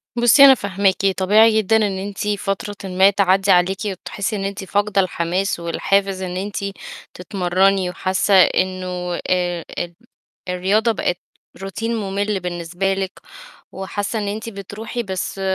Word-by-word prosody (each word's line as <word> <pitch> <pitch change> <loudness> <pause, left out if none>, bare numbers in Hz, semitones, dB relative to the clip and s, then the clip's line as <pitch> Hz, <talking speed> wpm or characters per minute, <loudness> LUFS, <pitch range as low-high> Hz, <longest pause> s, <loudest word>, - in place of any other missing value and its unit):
بُصي 240 +4 +7
أنا 270 - +8
فاهماكِ، 195 -2 0
طبيعي 215 +4 +5
جدًا 220 +1 +2
إن 205 -3 0
أنتِ 200 +2 -5
فترةٍ 205 0 -2
ما 190 +2 +5
تعدّي 195 0 +2
عليكِ 180 +2 +3
وتحسّي 200 +2 -4
إن 195 - -3
أنتِ 195 0 -4
فاقدة 205 +1 +1
الحماس 180 +1 -1
والحافز 190 +3 0
إن 180 -1 -4
أنتِ 200 +2 -5 0.6
تتمرني 185 0 +1
وحاسّة 185 +2 0
إنه 185 -1 +2
آآ، 175 -2 0
ال 175 0 -4 0.6
الرياضة 200 +6 +1
بقت 180 -4 -1 0.4
روتين 225 +4 -3
ممل 200 -1 -2
بالنسبة 175 +2 -2
لِك 190 -1 -3 0.6
وحاسّة 205 +3 -4
إن 205 - -3
أنتِ 220 +3 -4
بتروحي 215 +4 -6
بس 190 -1 -4
195 Hz, 135 wpm, -20 LUFS, 185-205 Hz, 0.6 s, أنا